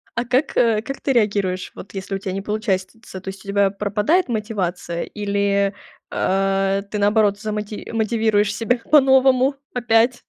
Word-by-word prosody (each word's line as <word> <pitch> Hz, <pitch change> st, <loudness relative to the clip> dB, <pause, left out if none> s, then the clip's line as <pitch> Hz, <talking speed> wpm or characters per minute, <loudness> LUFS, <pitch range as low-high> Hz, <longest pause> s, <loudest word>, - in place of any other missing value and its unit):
А 235 Hz, -, -1 dB
как, 255 Hz, +5 st, 0 dB
э, 225 Hz, -3 st, +3 dB
как 275 Hz, +4 st, -6 dB
ты 270 Hz, -, 0 dB
реагируешь, 200 Hz, -5 st, 0 dB
вот 200 Hz, -, -11 dB
если 195 Hz, 0 st, -4 dB
у -, -, -1 dB
тя 190 Hz, -1 st, -4 dB
не 195 Hz, -, -3 dB
получается? 205 Hz, -1 st, -3 dB
То 190 Hz, -, -6 dB
есть 195 Hz, +1 st, -10 dB
у -, -, -14 dB
тебя 200 Hz, 0 st, +2 dB
пропадает 210 Hz, -, +1 dB
мотивация 195 Hz, -7 st, -3 dB
или, 200 Hz, -1 st, 0 dB, 0.4 s
а, 195 Hz, 0 st, +1 dB
ты 210 Hz, -, -2 dB
наоборот 205 Hz, 0 st, +2 dB
замоти 210 Hz, -1 st, -5 dB
мотивируешь 220 Hz, -2 st, +1 dB
себя 235 Hz, +3 st, 0 dB
по-новому 265 Hz, -2 st, +4 dB, 0.2 s
опять? 240 Hz, 0 st, +2 dB
210 Hz, 155 wpm, -21 LUFS, 195-230 Hz, 0.4 s, по-новому